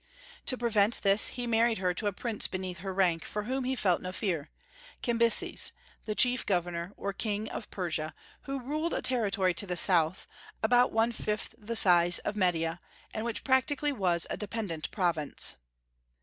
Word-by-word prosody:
To 255 Hz, -, +4 dB
prevent 225 Hz, -2 st, +1 dB
this, 200 Hz, +1 st, +5 dB
he 245 Hz, -1 st, -4 dB
married 230 Hz, 0 st, +2 dB
her 180 Hz, -1 st, 0 dB
to 205 Hz, +4 st, -1 dB
a -, -, +1 dB
prince 220 Hz, +2 st, -1 dB
beneath 185 Hz, -2 st, -5 dB
her 195 Hz, +2 st, -5 dB
rank, 180 Hz, -4 st, +1 dB
for 210 Hz, -, -5 dB
whom 260 Hz, +3 st, -2 dB
he 260 Hz, +1 st, -1 dB
felt 185 Hz, -7 st, +1 dB
no 185 Hz, -, -5 dB
fear, 175 Hz, -7 st, -3 dB, 0.5 s
Cambyses, 235 Hz, -2 st, +4 dB, 0.3 s
the 215 Hz, -, -3 dB
chief 250 Hz, +2 st, +4 dB
governor 175 Hz, -1 st, -2 dB
or 200 Hz, 0 st, -4 dB
king 210 Hz, +1 st, -3 dB
of 225 Hz, -, -6 dB
Persia, 160 Hz, -4 st, -3 dB, 0.3 s
who 275 Hz, 0 st, -4 dB
ruled 305 Hz, +6 st, -3 dB
a -, -, -3 dB
territory 200 Hz, -7 st, +1 dB
to 200 Hz, +4 st, -2 dB
the 180 Hz, -1 st, -1 dB
South, 175 Hz, -2 st, +2 dB, 0.4 s
about 245 Hz, +2 st, +4 dB
one 225 Hz, +1 st, +2 dB
fifth 210 Hz, -2 st, -4 dB
the 225 Hz, +2 st, -5 dB
size 175 Hz, -4 st, +6 dB
of 210 Hz, -, -3 dB
Media, 175 Hz, -3 st, 0 dB, 0.3 s
and 220 Hz, -, -4 dB
which 235 Hz, -2 st, -4 dB
practically 285 Hz, +2 st, +1 dB
was 180 Hz, -9 st, 0 dB
a -, -, -2 dB
dependent 205 Hz, -7 st, -4 dB
province. 170 Hz, -6 st, 0 dB
205 Hz, 175 wpm, -29 LUFS, 180-235 Hz, 0.5 s, size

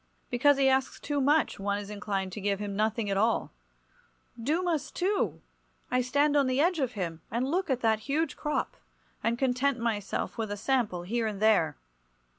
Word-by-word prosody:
Because 270 Hz, +3 st, +4 dB
he 275 Hz, -1 st, +4 dB
asks 265 Hz, 0 st, +1 dB
too 290 Hz, -1 st, -1 dB
much 295 Hz, -1 st, +2 dB
one 200 Hz, 0 st, 0 dB
is 205 Hz, 0 st, -6 dB
inclined 200 Hz, -2 st, -3 dB
to 205 Hz, -, -6 dB
give 200 Hz, 0 st, 0 dB
him 205 Hz, -1 st, -4 dB
nothing 215 Hz, +1 st, 0 dB
at 195 Hz, -, +1 dB
all. 225 Hz, +3 st, +1 dB, 0.9 s
Dumas, 315 Hz, +3 st, 0 dB
too! 390 Hz, +3 st, -1 dB, 0.5 s
I 250 Hz, 0 st, +3 dB
stand 285 Hz, +4 st, +2 dB
on 280 Hz, -2 st, +4 dB
the 255 Hz, +1 st, +1 dB
edge 340 Hz, +2 st, +3 dB
of 260 Hz, -3 st, 0 dB
him, 170 Hz, -6 st, -4 dB
and 240 Hz, +4 st, -1 dB
look 365 Hz, +1 st, 0 dB
at 255 Hz, -2 st, 0 dB
that 220 Hz, -1 st, +3 dB
huge 315 Hz, +4 st, 0 dB
crop, 300 Hz, -1 st, -2 dB, 0.5 s
and 230 Hz, +1 st, +1 dB
content 265 Hz, +1 st, +1 dB
myself 215 Hz, -3 st, -2 dB
with 220 Hz, -2 st, -1 dB
a 205 Hz, -, -3 dB
sample 215 Hz, -6 st, 0 dB
here 225 Hz, +5 st, -1 dB
and 205 Hz, -2 st, -4 dB
there. 200 Hz, -, +3 dB
235 Hz, 185 wpm, -29 LUFS, 205-280 Hz, 0.9 s, Because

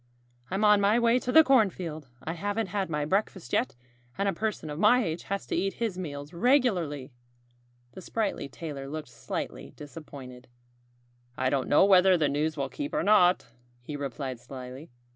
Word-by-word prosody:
"I'm 195 Hz, +3 st, 0 dB
on 210 Hz, -1 st, +6 dB
my 205 Hz, +3 st, +4 dB
way 235 Hz, +1 st, +3 dB
to 250 Hz, -, -3 dB
the 320 Hz, +5 st, +8 dB
cornfield. 185 Hz, -, +1 dB, 0.2 s
I 160 Hz, -, -3 dB
haven't 205 Hz, +4 st, -2 dB
had 195 Hz, -1 st, -2 dB
my 150 Hz, -2 st, -1 dB
breakfast 190 Hz, -, -2 dB
yet. -, -, +1 dB, 0.4 s
And 200 Hz, -, 0 dB
a 195 Hz, -, +1 dB
person 200 Hz, -5 st, -3 dB
of 150 Hz, -, -6 dB
my 240 Hz, +5 st, +5 dB
age 165 Hz, -3 st, -3 dB
has 200 Hz, 0 st, -3 dB
to -, -, -3 dB
eat 195 Hz, 0 st, 0 dB
his 225 Hz, -5 st, -2 dB
meals 145 Hz, -4 st, -6 dB
regularly." 175 Hz, -, +1 dB, 0.8 s
The 190 Hz, -, -10 dB
sprightly 205 Hz, -8 st, -2 dB
tailor 140 Hz, -2 st, -7 dB
looked 150 Hz, -2 st, -6 dB
slightly -, -, -6 dB
disappointed. 135 Hz, -4 st, -10 dB, 0.9 s
"I 130 Hz, 0 st, +1 dB
don't 135 Hz, -2 st, 0 dB
know 150 Hz, -, +6 dB
whether 190 Hz, -1 st, +6 dB
the 150 Hz, -3 st, +2 dB
news 150 Hz, +2 st, -1 dB
will 140 Hz, -1 st, -1 dB
keep 290 Hz, -, -5 dB
or -, -, +1 dB
not," 190 Hz, -3 st, +4 dB, 0.3 s
he 120 Hz, +5 st, -7 dB
replied 135 Hz, -2 st, -5 dB
slyly. 130 Hz, +4 st, -9 dB
170 Hz, 175 wpm, -28 LUFS, 145-205 Hz, 0.9 s, the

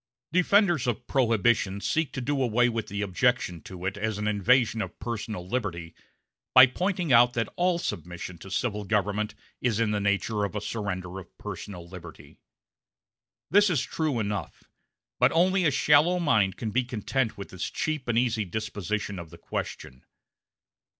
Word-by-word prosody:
Defenders 180 Hz, -, +3 dB
of 120 Hz, 0 st, -2 dB
Prohibition 115 Hz, -6 st, +2 dB
seek 160 Hz, +8 st, 0 dB
to 130 Hz, -, -3 dB
do 140 Hz, +2 st, -1 dB
away 120 Hz, 0 st, +3 dB
with 115 Hz, -2 st, -3 dB
the 100 Hz, +1 st, -3 dB
objection 100 Hz, -, 0 dB
to 90 Hz, -1 st, -9 dB
it 95 Hz, +2 st, -2 dB
as 110 Hz, 0 st, -2 dB
an 105 Hz, 0 st, -2 dB
invasion 115 Hz, +2 st, +3 dB
of -, -, -6 dB
personal 110 Hz, -6 st, -5 dB
liberty 90 Hz, -7 st, -3 dB, 0.6 s
by 130 Hz, 0 st, +11 dB
pointing 175 Hz, +3 st, -1 dB
out 120 Hz, +1 st, +6 dB
that 115 Hz, -2 st, -2 dB
all 180 Hz, 0 st, +2 dB
submission 90 Hz, -, -5 dB
to 95 Hz, -, -10 dB
civil 105 Hz, +1 st, -1 dB
government 105 Hz, +1 st, -1 dB, 0.3 s
is 115 Hz, -4 st, +1 dB
in 115 Hz, -2 st, +1 dB
the 105 Hz, -, 0 dB
nature 100 Hz, +1 st, 0 dB
of 100 Hz, +1 st, -3 dB
a -, -, 0 dB
surrender 95 Hz, -4 st, -4 dB
of 95 Hz, -, -15 dB
personal 90 Hz, -4 st, -7 dB
liberty. 85 Hz, -3 st, -12 dB, 1.1 s
This 205 Hz, +2 st, +5 dB
is 150 Hz, -8 st, +1 dB
true 155 Hz, -5 st, -1 dB
enough, 100 Hz, -5 st, -4 dB, 0.6 s
but -, -, +5 dB
only 185 Hz, +2 st, +3 dB
a -, -, +5 dB
shallow 150 Hz, +5 st, +4 dB
mind 110 Hz, -, +2 dB
can 110 Hz, -2 st, -3 dB
be 125 Hz, +4 st, +2 dB
content 120 Hz, 0 st, -2 dB
with 100 Hz, -, -7 dB
this 95 Hz, -1 st, -4 dB
cheap 155 Hz, -5 st, -3 dB
and 115 Hz, -1 st, +1 dB
easy 115 Hz, -3 st, +1 dB
disposition 105 Hz, -1 st, -3 dB
of 85 Hz, -2 st, -8 dB
the 85 Hz, -, -13 dB
question. 65 Hz, -5 st, -6 dB
110 Hz, 165 wpm, -27 LUFS, 100-130 Hz, 1.1 s, by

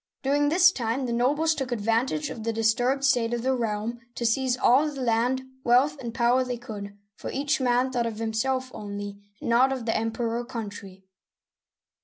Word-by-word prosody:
During 290 Hz, +2 st, +2 dB
this 355 Hz, +3 st, +6 dB
time, 245 Hz, -1 st, -2 dB
the 240 Hz, -, -2 dB
nobles 295 Hz, +7 st, +2 dB
took 270 Hz, -4 st, -4 dB
advantage 240 Hz, +6 st, 0 dB
of 230 Hz, -, -7 dB
the 230 Hz, -, 0 dB
disturbed 245 Hz, +5 st, +1 dB
state 240 Hz, -4 st, +2 dB
of 235 Hz, -, -4 dB
the 265 Hz, +1 st, +2 dB
realm 230 Hz, 0 st, -2 dB, 0.2 s
to 235 Hz, -, -3 dB
seize 250 Hz, +2 st, +1 dB
all 265 Hz, +4 st, +4 dB
the 285 Hz, -2 st, -8 dB
land, 250 Hz, +2 st, +1 dB, 0.2 s
wealth, 255 Hz, +5 st, +4 dB
and 235 Hz, -2 st, -5 dB
power 240 Hz, +2 st, +2 dB
they 250 Hz, -1 st, -4 dB
could, 205 Hz, -4 st, -8 dB, 0.2 s
for -, -, -6 dB
each 285 Hz, +1 st, 0 dB
man 250 Hz, +1 st, +2 dB
thought 240 Hz, -2 st, 0 dB
of 220 Hz, -2 st, -5 dB
himself 255 Hz, +4 st, -1 dB
only, 205 Hz, -1 st, -6 dB, 0.2 s
and -, -, -3 dB
not 255 Hz, +3 st, +4 dB
of 260 Hz, -3 st, -3 dB
the 225 Hz, -, 0 dB
Emperor 225 Hz, +1 st, -1 dB
or 240 Hz, -, -5 dB
country. 200 Hz, -5 st, -8 dB
240 Hz, 190 wpm, -26 LUFS, 225-265 Hz, 0.2 s, this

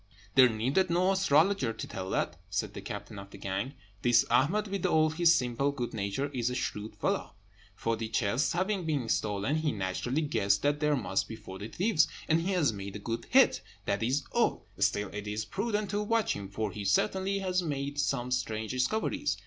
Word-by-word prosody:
"There 130 Hz, -2 st, +7 dB
needed 130 Hz, -, +1 dB
no 180 Hz, +3 st, +3 dB
astrologer 185 Hz, -, +3 dB
to -, -, -6 dB
tell 95 Hz, 0 st, -5 dB
that," -, -, -1 dB
said -, -, -2 dB
the -, -, -7 dB
captain 100 Hz, -, -7 dB
of 100 Hz, 0 st, -10 dB
the -, -, -11 dB
gang. 100 Hz, +9 st, -3 dB, 0.3 s
"This 120 Hz, -1 st, +4 dB
Ahmed, 165 Hz, -, +3 dB
with 195 Hz, -2 st, -3 dB
all 155 Hz, 0 st, +3 dB
his 170 Hz, +1 st, +5 dB
simple 130 Hz, +1 st, 0 dB
good 125 Hz, -4 st, -4 dB
nature, 105 Hz, +6 st, -2 dB
is 120 Hz, -2 st, 0 dB
a 125 Hz, -, -3 dB
shrewd 110 Hz, -3 st, -3 dB
fellow. -, -, -2 dB, 0.4 s
Forty 115 Hz, -1 st, -2 dB
chests 115 Hz, +4 st, +1 dB
having 190 Hz, +2 st, 0 dB
been 145 Hz, -7 st, 0 dB
stolen, 105 Hz, +7 st, 0 dB
he 155 Hz, -1 st, 0 dB
naturally 110 Hz, -, -1 dB
guessed 100 Hz, -8 st, +1 dB
that 145 Hz, 0 st, +2 dB
there 150 Hz, -1 st, +2 dB
must 130 Hz, -, -1 dB
be 110 Hz, -, -6 dB
forty 100 Hz, -2 st, -8 dB
thieves, 180 Hz, -, +2 dB, 0.2 s
and 165 Hz, +1 st, +3 dB
he 190 Hz, +3 st, -1 dB
has 155 Hz, -10 st, +2 dB
made 100 Hz, 0 st, -7 dB
a 105 Hz, -, -8 dB
good 115 Hz, 0 st, -3 dB
hit, -, -, +5 dB, 0.2 s
that -, -, 0 dB
is 130 Hz, +5 st, +1 dB
all; -, -, +1 dB
still 105 Hz, -1 st, +1 dB
it 105 Hz, 0 st, -6 dB
is 105 Hz, +1 st, -2 dB
prudent 205 Hz, -1 st, -2 dB
to 205 Hz, 0 st, 0 dB
watch 225 Hz, +1 st, +1 dB
him, 100 Hz, -1 st, -6 dB
for 105 Hz, +1 st, -3 dB
he 105 Hz, -, -6 dB
certainly 190 Hz, -, +1 dB
has 185 Hz, -1 st, 0 dB
made 145 Hz, -3 st, -3 dB
some 125 Hz, -3 st, 0 dB
strange 110 Hz, -4 st, -1 dB
discoveries. 130 Hz, -, 0 dB
130 Hz, 195 wpm, -30 LUFS, 110-170 Hz, 0.4 s, There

